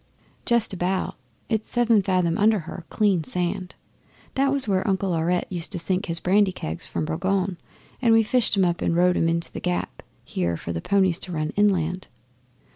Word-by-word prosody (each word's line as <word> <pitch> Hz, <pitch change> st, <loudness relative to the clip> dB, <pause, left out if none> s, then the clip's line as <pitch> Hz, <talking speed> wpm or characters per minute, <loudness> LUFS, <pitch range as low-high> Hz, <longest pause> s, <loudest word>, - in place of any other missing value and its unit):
'Just 235 Hz, -4 st, +2 dB
about. 185 Hz, +1 st, -1 dB, 0.3 s
It's 220 Hz, -2 st, -2 dB
seven 235 Hz, -3 st, +3 dB
fathom 185 Hz, -3 st, +1 dB
under 215 Hz, +3 st, +4 dB
her 165 Hz, +1 st, -9 dB
clean 200 Hz, -6 st, +2 dB
sand. 180 Hz, +6 st, -3 dB, 0.6 s
That 275 Hz, 0 st, +2 dB
was 275 Hz, -4 st, +1 dB
where 190 Hz, -1 st, +1 dB
Uncle 190 Hz, -1 st, 0 dB
Aurette 175 Hz, +2 st, 0 dB
used 175 Hz, -2 st, -4 dB
to -, -, -2 dB
sink 185 Hz, +4 st, -1 dB
his 165 Hz, 0 st, -2 dB
brandy 195 Hz, +2 st, +3 dB
kegs 80 Hz, -, -5 dB
from 85 Hz, -2 st, -3 dB
Boulogne, 185 Hz, -, -1 dB, 0.4 s
and 235 Hz, -3 st, +4 dB
we 225 Hz, 0 st, +6 dB
fished 225 Hz, -2 st, +2 dB
'em 190 Hz, -, +4 dB
up 175 Hz, -1 st, -1 dB
and 170 Hz, -, +1 dB
rowed 180 Hz, +1 st, +4 dB
'em 165 Hz, -, +2 dB
into 170 Hz, 0 st, -2 dB
The -, -, -6 dB
Gap 180 Hz, 0 st, -3 dB, 0.2 s
here 85 Hz, -2 st, -2 dB
for 85 Hz, -, -5 dB
the 80 Hz, -, -3 dB
ponies 190 Hz, -, +2 dB
to 185 Hz, -, -8 dB
run 155 Hz, -2 st, -2 dB
inland. 185 Hz, -3 st, +1 dB
185 Hz, 190 wpm, -24 LUFS, 170-205 Hz, 0.6 s, we